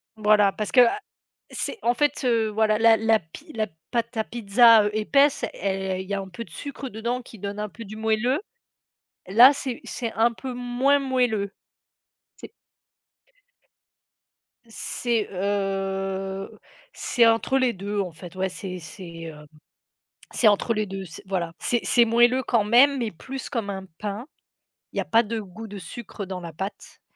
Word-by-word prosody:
Voilà, 210 -2 +4
parce 210 +1 -4
que, 250 - +7
heu, 240 - +7 0.6
c'est - - -3
en 240 - +3
fait, 290 +2 0
heu, 230 -3 +2
voilà 215 0 +2
la 225 0 +6
la 225 0 +3
pi 240 - -14
la 220 -1 -1 0.2
pâte 235 0 -2
à 220 - +1
pizza, 230 0 +5
heu, 210 - 0
épaisse 275 +6 +3
elle 190 -1 -2
il 190 - -10
y 200 - -4
a 200 - 0
un 190 - -8
peu 210 +6 -7
de - - -18
sucre 275 - -7
dedans 235 +3 -3
qui 230 -3 -14
donne 205 +1 -5
un 210 - -3
peu 230 +4 -10
du 215 +2 -9
moelleux. 225 - 0 0.9
Là 240 +8 +8
c'est 265 -3 -5
c'est 230 -3 -4
un 230 +2 +3
peu 255 +2 -6
moins 250 +3 +2
moelleux. 245 -7 0 0.9
C'est - - -11 2.1
C'est, 230 0 -2
heu, 195 0 -2 0.3
c'est 240 -2 +2
entre 230 +4 +2
les 255 -3 +2
2 200 +2 -4
en 185 -3 -4
fait, 175 +2 -12
ouais, 190 0 -1
c'est 185 0 -6
c'est, 170 0 -10
hem, 150 -2 -10 0.9
c'est 240 - +2
entre 210 +3 +2
les 215 -1 -1
2 195 0 -6
c'est 165 - -11
voilà. 175 -3 -2
C'est 240 -1 0
c'est 240 - +4
moelleux 240 +3 +4
quand 230 -4 +1
même, 260 +6 +5
mais 230 -3 -1
plus 265 +10 -7
comme 225 -6 -2
un 190 -1 -6
pain, 210 +4 -5 0.7
il - - -8
y - - +2
a - - -5
pas 230 +1 +4
de 225 +1 -3
goût 215 +2 -9
de 205 -1 -8
sucre 205 +1 -8
dans 185 -1 -5
la 170 -2 -8
pâte 195 +6 -7
220 Hz, 175 wpm, -25 LUFS, 195-240 Hz, 2.1 s, Là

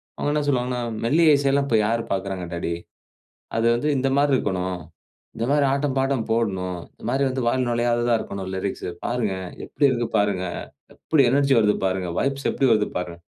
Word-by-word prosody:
அவங்க 145 - -1
என்ன 150 - +1
சொல்வாங்கன்னா, 125 -2 0 0.2
"மெல்லிய 155 +4 +5
இசைல்லாம் 140 0 +2
இப்ப 115 - +3
யாரு 115 +1 +1
பாக்குறாங்க 95 -2 -2
டாடி 85 0 -2 0.8
அது 115 +1 +1
வந்து 145 +6 -1
இந்த 135 +1 +1
மாரி 145 0 +3
இருக்கணும். 95 -6 -1 0.6
இந்த 115 +1 -1
மாரி 145 -1 +3
ஆட்டம், 140 -1 0
பாட்டம் 135 -3 +1
போடணும். 95 -6 -1
இந்த - - -17
மாரி 135 +2 +1
வந்து, 130 -1 -2
வாயில 130 0 +1
நுழையாததா 120 0 +1
இருக்கணும் 95 -1 -6
லிரிக்ஸ்சு 95 -1 -3
பாருங்க. 120 -5 -1 0.3
எப்படி 145 - +1
இருக்கு 120 -2 -1
பாருங்க. 100 -3 +1 0.5
எப்படி 155 -4 +2
எனர்ஜி 140 0 +3
வருது 105 -1 +3
பாருங்க? 95 -1 -1
வைப்ஸ் 135 0 -1
எப்படி 135 - +2
வருது? 105 -1 +2
பாருங்க." 90 -1 -4
120 Hz, 170 wpm, -23 LUFS, 95-135 Hz, 0.8 s, மெல்லிய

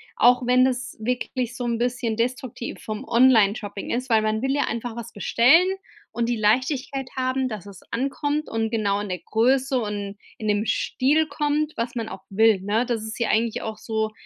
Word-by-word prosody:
auch 245 +1 +4
wenn 250 +1 +5
das 260 0 -1
wirklich 245 +1 -2
so 245 - -3
'n 235 -1 0
bisschen 240 -1 -1
destruktiv 245 +1 -3
vom 215 +2 -5
Online-Shopping 220 -5 +3
ist, 250 +2 -2
weil 220 -2 +4
man 215 0 0
will 270 +1 0
ja 285 - +2
einfach 230 0 -4
was 235 -1 -7
bestellen 250 - +4 0.5
und 235 0 -1
die 240 - 0
Leichtigkeit 260 +4 0
haben, 255 0 0
dass 210 -4 -6
es 200 -2 -12
ankommt 290 +4 -1
und 225 0 -1
genau 205 -3 0
in 205 - -5
der 180 -1 -3
Größe 260 +4 +1
und 205 -2 -4 0.2
in 215 - -5
dem 210 +1 +1
Stil 280 +7 +1
kommt, 295 +1 -1
was 235 +2 -3
man 230 -2 -3
auch 190 -2 -9
will, 215 -1 +4
ne? 215 +5 0
Das 235 -3 -2
ist 220 +2 -6
ja 235 - +1
eigentlich 225 0 +1
auch 220 -1 -5
so, 220 0 -2
235 Hz, 195 wpm, -24 LUFS, 220-255 Hz, 0.5 s, wenn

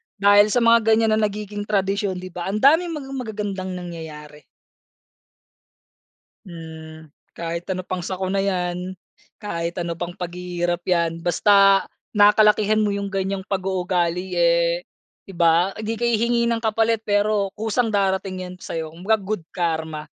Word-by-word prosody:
dahil 205 0 +5
sa 235 +3 +1
mga 230 0 +6 0.2
ganyan 225 0 +2
na 215 - +2
nagiging 205 0 -6
tradisyon 200 -1 0
'di 185 0 -8
ba 175 +1 -5
ang 195 - -2
daming 325 +4 +4
mga 270 -3 -7
magagandang 200 -5 -4
nangyayari. 155 -4 -9 2.0
Hmm, 160 -2 -10 0.3
kahit 170 0 -4
ano 185 0 -2
pang 185 -2 -4
sakuna 190 +2 -2
yan, 180 -1 -2 0.4
kahit 170 -4 -4
ano 170 -1 -3
pang 175 +1 -5
paghihirap 175 -1 -3
yan, 170 -2 0
basta, 195 +2 +4 0.3
nakalakihan 210 +1 +4
mo 210 -1 +1
yung 200 0 -3
ganyang 195 0 -3
pag 190 -2 -2
uugali, 180 -1 -1
eh, 170 0 +2 0.4
'di 195 - -11
ba 170 +3 +3
hindi 220 +1 -3
ka 240 - -4
hihingi 235 +1 +2
ng 230 -1 -1
kapalit, 225 0 +1
pero, 205 -1 +1
kusang 225 +2 0
darating 190 -1 0
yan 180 0 -9
sayo 160 -3 -5
kumbaga 190 +7 +1
mag - - -12
good 210 -3 -3
karma. 160 -3 -2
190 Hz, 145 wpm, -22 LUFS, 175-210 Hz, 2.0 s, mga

